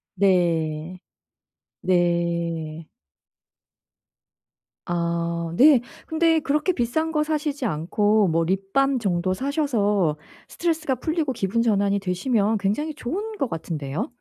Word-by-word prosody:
네. 170 Hz, -3 st, +1 dB, 0.8 s
네. 170 Hz, -3 st, 0 dB, 2.0 s
아 170 Hz, -1 st, -2 dB
네. 275 Hz, -2 st, +7 dB, 0.2 s
근데 325 Hz, 0 st, +2 dB
그렇게 300 Hz, +5 st, +1 dB
비싼 315 Hz, +5 st, -1 dB
거 300 Hz, -1 st, +1 dB
사시지 295 Hz, -3 st, -2 dB
않고 205 Hz, +4 st, +2 dB
뭐 165 Hz, +1 st, +2 dB
립밤 195 Hz, +9 st, +1 dB
정도 185 Hz, -3 st, 0 dB
사셔서 210 Hz, -, 0 dB, 0.3 s
스트레스가 320 Hz, -5 st, -1 dB
풀리고 310 Hz, +1 st, -1 dB
기분 220 Hz, +2 st, 0 dB
전환이 200 Hz, -3 st, +2 dB
되시면 200 Hz, +3 st, 0 dB
굉장히 210 Hz, +11 st, -1 dB
좋은 410 Hz, -, -4 dB
것 275 Hz, -, -1 dB
같은데요? 160 Hz, -, -4 dB
200 Hz, 215 characters per minute, -24 LUFS, 170-280 Hz, 2.0 s, 네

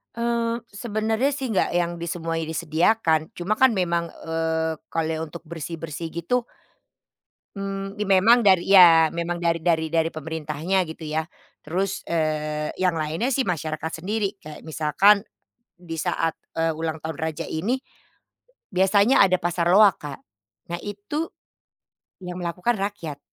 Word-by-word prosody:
Eee, 235 Hz, 0 st, 0 dB, 0.2 s
sebenarnya 220 Hz, +4 st, 0 dB
sih 270 Hz, -2 st, -3 dB
enggak 220 Hz, -5 st, +1 dB
yang 175 Hz, 0 st, 0 dB
di 170 Hz, -, -7 dB
semuanya 165 Hz, -1 st, -2 dB
disediakan, 160 Hz, +1 st, +1 dB
cuma 190 Hz, +5 st, -2 dB
kan 260 Hz, +2 st, +5 dB
memang, 170 Hz, -4 st, 0 dB
eee, 160 Hz, 0 st, -2 dB, 0.2 s
kalau 160 Hz, -1 st, -1 dB
untuk 165 Hz, +2 st, -8 dB
bersih-bersih 165 Hz, 0 st, -6 dB
gitu, 200 Hz, +9 st, -1 dB, 1.1 s
mmm, 195 Hz, 0 st, -4 dB
memang 210 Hz, +5 st, +5 dB
dari 190 Hz, -4 st, +4 dB
ya, 175 Hz, -4 st, +8 dB
memang 170 Hz, +1 st, -2 dB
dari 170 Hz, -1 st, 0 dB
dari 160 Hz, -2 st, +2 dB
dari 165 Hz, 0 st, +2 dB
pemerintahnya, 160 Hz, +4 st, -2 dB
gitu 160 Hz, 0 st, -8 dB
ya. 155 Hz, +1 st, -1 dB, 0.4 s
Terus, 185 Hz, +5 st, -2 dB
eee, 155 Hz, -2 st, -1 dB
yang 180 Hz, -3 st, +2 dB
lainnya 160 Hz, -, -1 dB
sih 265 Hz, 0 st, +1 dB
masyarakat 160 Hz, -1 st, -3 dB
sendiri. 205 Hz, 0 st, -1 dB
Kayak 155 Hz, +1 st, -10 dB
misalkan 160 Hz, +7 st, +4 dB, 0.5 s
di 170 Hz, -2 st, -8 dB
saat, 165 Hz, -1 st, -1 dB, 0.2 s
eee, 165 Hz, 0 st, +1 dB
ulang 160 Hz, -1 st, -3 dB
tahun 160 Hz, -2 st, -5 dB
raja 160 Hz, -1 st, -3 dB
ini 195 Hz, +11 st, 0 dB, 1.0 s
biasanya 200 Hz, +7 st, +4 dB
ada 185 Hz, -1 st, +3 dB
pasar 175 Hz, -1 st, 0 dB
loak, 200 Hz, -1 st, +6 dB
Kak. 145 Hz, -2 st, -6 dB, 0.5 s
Nah, 175 Hz, -, -2 dB
itu 205 Hz, +11 st, -4 dB, 1.0 s
yang 180 Hz, 0 st, -5 dB
melakukan 180 Hz, +7 st, -1 dB
rakyat. 180 Hz, -8 st, -4 dB
170 Hz, 135 wpm, -24 LUFS, 160-200 Hz, 1.1 s, ya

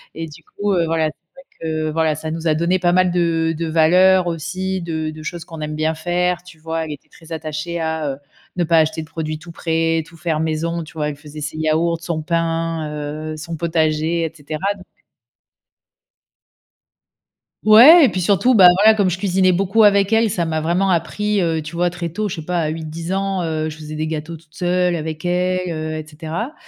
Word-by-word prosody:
et 165 Hz, +1 st, -4 dB
du 155 Hz, +1 st, -13 dB
coup 205 Hz, +2 st, -2 dB
heu, 170 Hz, -2 st, +2 dB
voilà, 160 Hz, -1 st, +1 dB
c'est 160 Hz, +2 st, -12 dB
vrai 270 Hz, -, -15 dB, 0.2 s
que 155 Hz, -1 st, -2 dB
voilà, 160 Hz, -1 st, +1 dB
ça 155 Hz, +1 st, -5 dB
nous 165 Hz, +1 st, -3 dB
a 155 Hz, -, +3 dB
donné 175 Hz, +3 st, +1 dB
pas 175 Hz, -1 st, +2 dB
mal 185 Hz, -1 st, +3 dB
de 165 Hz, -2 st, +1 dB
de 165 Hz, 0 st, -2 dB
valeurs 180 Hz, +4 st, +4 dB
aussi, 180 Hz, +3 st, -3 dB
de 160 Hz, -2 st, -3 dB
de 155 Hz, 0 st, -10 dB
choses 170 Hz, +1 st, -6 dB
qu'on 160 Hz, -2 st, -9 dB
aime 150 Hz, 0 st, -4 dB
bien 155 Hz, +1 st, 0 dB
faire, 175 Hz, +2 st, 0 dB
tu 180 Hz, -2 st, -15 dB
vois? 160 Hz, 0 st, -3 dB
Elle 155 Hz, -, -7 dB
était 140 Hz, -, -14 dB
très 165 Hz, 0 st, -17 dB
attachée 160 Hz, +2 st, -4 dB
à, 160 Hz, -2 st, -2 dB
heu, 135 Hz, -, -9 dB, 0.4 s
ne 175 Hz, -, +2 dB
pas 165 Hz, 0 st, +4 dB
acheter 160 Hz, +1 st, +1 dB
de -, -, -13 dB
produits 155 Hz, -1 st, -4 dB
tout 175 Hz, +1 st, -11 dB
prêts, 165 Hz, -1 st, 0 dB
tout 165 Hz, -, -16 dB
faire 160 Hz, -2 st, -1 dB
maison, 160 Hz, +2 st, -1 dB
tu 160 Hz, -, -13 dB
vois? 150 Hz, -2 st, -2 dB
Elle 145 Hz, -, -5 dB
faisait 150 Hz, 0 st, -10 dB
ses 150 Hz, +2 st, -5 dB
yaourts, 160 Hz, +2 st, 0 dB
son 165 Hz, -2 st, -3 dB
pain, 165 Hz, -1 st, -1 dB, 0.4 s
heu, 155 Hz, -, -7 dB
son 165 Hz, +2 st, -6 dB
potager 160 Hz, 0 st, 0 dB
et 160 Hz, -, -2 dB
cetera, 150 Hz, 0 st, -6 dB, 0.2 s
donc 185 Hz, -2 st, -14 dB
heu -, -, -34 dB, 2.6 s
Ouais, 265 Hz, +10 st, +9 dB
et -, -, +3 dB
puis 185 Hz, -, -2 dB
surtout, 200 Hz, +7 st, +3 dB
bah, 190 Hz, -6 st, +8 dB
voilà, 220 Hz, +2 st, +6 dB
comme 200 Hz, -3 st, +2 dB
je 180 Hz, -, -2 dB
cuisinais 185 Hz, -1 st, +2 dB
beaucoup 195 Hz, +4 st, +2 dB
avec 200 Hz, 0 st, +4 dB
elle, 225 Hz, -1 st, +4 dB
ça 175 Hz, -4 st, -1 dB
m'a 160 Hz, -1 st, -1 dB
vraiment 180 Hz, +4 st, +1 dB
appris, 205 Hz, +4 st, 0 dB
heu, 160 Hz, -2 st, 0 dB
tu 155 Hz, +2 st, -8 dB
vois? 175 Hz, +1 st, +2 dB
Très 175 Hz, -1 st, -5 dB
tôt, 210 Hz, +5 st, -3 dB
je -, -, -4 dB
sais 160 Hz, -, -8 dB
pas 180 Hz, 0 st, -1 dB
à 155 Hz, -, 0 dB
8-10 160 Hz, +2 st, -5 dB
ans, 195 Hz, -1 st, -1 dB
heu, 155 Hz, -1 st, -2 dB
je 155 Hz, -, -10 dB
faisais 155 Hz, 0 st, -8 dB
des 155 Hz, +1 st, -2 dB
gâteaux 160 Hz, +1 st, -4 dB
toute 155 Hz, -1 st, -25 dB
seule 180 Hz, -1 st, +1 dB
avec 160 Hz, 0 st, -5 dB
elle, 180 Hz, 0 st, 0 dB
heu, 155 Hz, -1 st, -4 dB
et 155 Hz, -, -6 dB
cetera, 160 Hz, -, -5 dB
165 Hz, 220 wpm, -20 LUFS, 155-180 Hz, 2.6 s, Ouais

